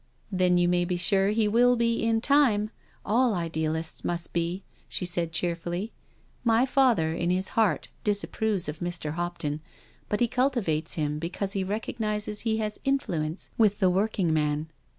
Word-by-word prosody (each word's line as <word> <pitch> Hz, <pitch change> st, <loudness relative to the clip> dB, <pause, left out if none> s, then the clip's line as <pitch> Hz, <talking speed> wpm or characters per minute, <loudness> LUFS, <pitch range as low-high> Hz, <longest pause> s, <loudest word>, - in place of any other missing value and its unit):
" -, -, -37 dB
Then 180 Hz, -2 st, +3 dB
you 175 Hz, 0 st, +3 dB
may 175 Hz, 0 st, +2 dB
be 175 Hz, 0 st, -1 dB
sure 195 Hz, +2 st, +3 dB
he 215 Hz, 0 st, +2 dB
will 245 Hz, +3 st, +4 dB
be 230 Hz, -1 st, +1 dB
in 225 Hz, 0 st, +2 dB
time— 240 Hz, -6 st, +3 dB, 0.3 s
all 235 Hz, 0 st, +3 dB
idealists 160 Hz, -1 st, -2 dB
must 170 Hz, -1 st, -3 dB
be," 170 Hz, +3 st, -1 dB, 0.3 s
she -, -, -2 dB
said 175 Hz, -2 st, +1 dB
cheerfully. 175 Hz, +4 st, -2 dB, 0.3 s
" -, -, -36 dB
My 235 Hz, +3 st, +4 dB
father 250 Hz, -, +3 dB
in 170 Hz, +1 st, -1 dB
his 185 Hz, +1 st, +1 dB
heart 220 Hz, -3 st, +1 dB
disapproves 205 Hz, -2 st, 0 dB
of 150 Hz, +1 st, -5 dB
Mr. 175 Hz, -3 st, -3 dB
Hopton, 165 Hz, -3 st, -3 dB, 0.5 s
but 210 Hz, -, 0 dB
he 240 Hz, -, +3 dB
cul 255 Hz, +3 st, +2 dB
tivates 165 Hz, -, -1 dB
him 150 Hz, -1 st, -1 dB
because 190 Hz, +4 st, -2 dB
he 195 Hz, -, -1 dB
recognises 210 Hz, +1 st, -3 dB
he 220 Hz, -1 st, 0 dB
has 215 Hz, -1 st, -3 dB
influence 175 Hz, -, -1 dB
with 210 Hz, -2 st, +4 dB
the 185 Hz, -3 st, +4 dB
working 190 Hz, -3 st, +1 dB
man." 150 Hz, 0 st, 0 dB
190 Hz, 170 wpm, -27 LUFS, 170-220 Hz, 0.5 s, will